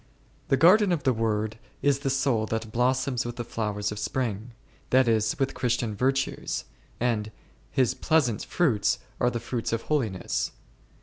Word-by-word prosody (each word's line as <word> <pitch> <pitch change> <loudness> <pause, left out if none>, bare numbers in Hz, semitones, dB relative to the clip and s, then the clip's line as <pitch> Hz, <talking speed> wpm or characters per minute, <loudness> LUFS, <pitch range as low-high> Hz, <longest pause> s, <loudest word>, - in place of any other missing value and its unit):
The 135 - +3
garden 185 - +6
of 165 -5 0
the 130 - +3
Word 110 -1 -1 0.2
is 140 -1 +3
the 140 -1 -1
soul 130 -5 +1
that 110 0 -3
blossoms 125 +2 +1
with 120 0 -5
the 120 - -4
flowers 105 -3 -2
of 105 - -5
spring, 115 -1 -2 0.4
that 130 0 +4
is, 110 -1 +2
with 135 -1 0
Christian 120 -3 -1
virtues, 135 +4 -1 0.3
and 110 -3 0 0.4
His 130 -2 +2
pleasant 130 -8 +1
fruits 130 -13 +1 0.2
are 120 - +3
the 120 - -3
fruits 120 0 -3
of 115 0 -1
holiness. 115 -12 -1
120 Hz, 160 wpm, -27 LUFS, 110-135 Hz, 0.4 s, garden